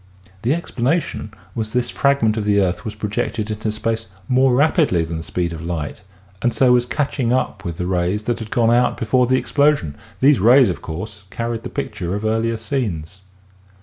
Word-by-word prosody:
The 125 +8 +2
explanation 140 -6 -2 0.2
was 110 -2 -2
that 125 - -1
this 125 - 0
fragment 140 -6 +2
of 110 - -1
the 100 0 +3
earth 90 -2 0
was 105 -1 -5
projected 105 +1 -2
into 110 0 -2
space 115 +1 -2 0.2
more 130 0 +4
rapidly 140 - +3
than 80 0 -4
the - - -5
speed 85 0 -2
of 80 - -7
light 80 -3 -4 0.4
and 120 - +2
so 125 +2 +4
was 120 0 +3
catch 145 +1 -2
ing 120 -2 +1
up 125 -6 -1
with 85 -4 -5
the 90 - -2
rays 90 +3 0
that 120 +2 -1
had 110 -1 -7
gone 115 0 +2
out 120 +1 +3
before 125 +2 +2
the 130 +1 +3
ex - - -4
plosion; 145 - +3 0.3
these 140 +1 +5
rays, 120 +3 +6
of 90 - -4
course, 100 +5 -7
carried 115 +2 -3
the - - -6
picture 90 +2 -3
of 105 +2 -4
earlier 115 +1 0
scenes. 105 - -3
110 Hz, 205 wpm, -20 LUFS, 95-125 Hz, 0.4 s, rays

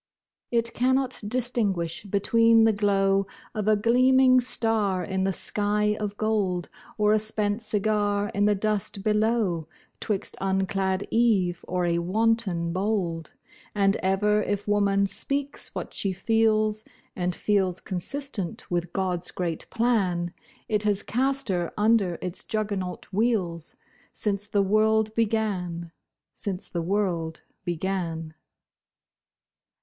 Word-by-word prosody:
It 235 -1 0
cannot 260 +1 +1
distinguish 210 -8 -1
between 225 +3 +4
the 225 -1 +4
glow 195 -1 +2 0.3
Of 215 -3 -3
a 215 - +5
gleaming 255 +4 +5
star, 220 -6 +2
in 190 -1 -1
the 195 - +1
sky 210 +2 +1
of 205 -1 -4
gold, 200 -5 0 0.3
Or 210 0 +3
a 215 - +4
spent 210 0 0
cigar 205 -1 0
in 205 +1 +1
the 210 0 +3
dust 205 -1 -1
below— 210 -6 +1 0.3
'Twixt 210 -4 -3
unclad 190 0 0
Eve 200 -7 +2
or 180 -1 0
a 170 0 +1
wanton 190 -2 0
bold; 180 -5 -2 0.4
And 195 -1 +3
ever 210 +3 +2
if 205 0 -2
woman 200 -1 +2
speaks 280 +7 -2
what - - -5
she 195 -2 -1
feels 215 +1 +1 0.3
(And 180 -1 -1
feels 190 -3 +1
consistent 225 +1 -2
with 175 -1 -2
God's 180 -2 -1
great 170 -3 -4
plan) 190 -8 0 0.3
It 210 -1 +1
has 205 -1 +1
cast 270 +2 0
her 175 -3 -1
under 210 -5 +2
its 180 -1 -5
juggernaut 200 -4 -3
wheels, 185 -7 0 0.4
Since 205 -1 -1
the 205 -1 +2
world 215 +2 +2
began—since 195 -3 -3
the 170 - -2
world 170 -3 -1 0.2
began. 170 -2 -3
205 Hz, 120 wpm, -26 LUFS, 185-220 Hz, 0.4 s, a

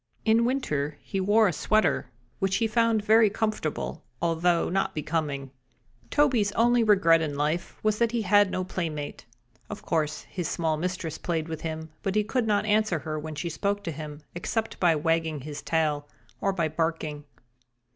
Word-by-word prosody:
In 225 +1 +4
winter 150 - -1
he 195 - -3
wore 205 +3 +4
a 180 - 0
sweater, 175 -9 +1 0.3
which 195 0 +1
he 225 - +2
found 225 -1 +2
very 220 0 +6
comfortable, 210 -7 -2 0.2
although 170 +1 +2
not 195 +2 +1
so - - -27
becoming. 145 -3 -2 0.6
Toby's 250 -9 +3
only 240 +1 +4
regret 190 -6 +5
in 150 -3 -2
life 150 +4 -1
was 215 0 +1
that 235 -1 +2
he 235 -2 -1
had 205 0 +5
no 185 - -2
playmate. 155 -8 -4 0.4
Of - - -7
course 155 -2 -1
his 175 -4 -4
small 160 -2 0
mistress 170 -1 -3
played 165 -2 -2
with 160 -1 -5
him, 160 -1 -5
but 195 0 -2
he 210 - +3
could 235 +2 -1
not 210 0 +2
answer 215 -4 +2
her 155 +1 -4
when 155 0 -6
she 160 +4 -3
spoke 200 +5 -1
to 165 - -3
him, 150 0 -7
except 220 +6 -3
by 170 -3 +4
wagging 160 -1 0
his 145 +1 -6
tail 150 -3 0 0.3
or 195 - +1
by 170 -4 0
barking. 155 -2 -2
170 Hz, 175 wpm, -27 LUFS, 155-210 Hz, 0.6 s, very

